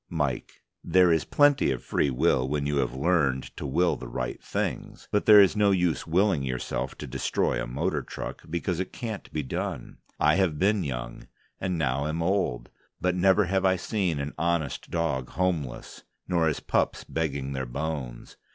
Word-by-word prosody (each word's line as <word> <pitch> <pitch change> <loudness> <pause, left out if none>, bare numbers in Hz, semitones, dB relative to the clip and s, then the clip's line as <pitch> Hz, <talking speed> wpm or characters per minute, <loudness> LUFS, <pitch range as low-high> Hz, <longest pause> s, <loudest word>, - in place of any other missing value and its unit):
MIKE: 75 -6 -3 0.2
There 90 -1 +4
is 80 - +1
plenty 145 - +4
of 65 -2 -2
free 70 - +1
will 65 0 +2
when 75 -1 -1
you 70 0 0
have 65 - 0
learned 70 -4 +1
to 75 - -5
will 85 +6 +2
the 65 - -8
right - - -4
things. - - -4
But 105 - +1
there's 105 -3 +8
no 105 -1 +4
use 90 -5 +1
willing 95 -1 +2
yourself 65 -1 -3
to - - -6
destroy 65 +1 -1
a - - -4
motor 75 +5 -1
truck, - - -7
because 85 +1 -2
it 95 - -3
can't 110 -4 -6
be 75 - -2
done. 65 - -5 0.2
I 75 - +4
have 90 -6 +1
been 100 +3 +2
young, 65 -2 -5 0.3
and 90 -2 -1
now 70 -2 0
am 80 +2 -2
old, 85 -10 -1 0.3
but 90 0 +1
never 95 +3 +4
have 95 +2 0
I 95 -1 +4
seen 90 -4 -1
an 70 +1 -4
honest 85 -4 -1
dog 75 -7 -1
homeless, 85 -8 -3 0.2
nor 85 -2 +2
his 75 - -1
pups - - 0
begging 70 -4 -3
their 65 -2 -3
bones. 65 -2 -5
80 Hz, 180 wpm, -27 LUFS, 65-90 Hz, 0.3 s, there's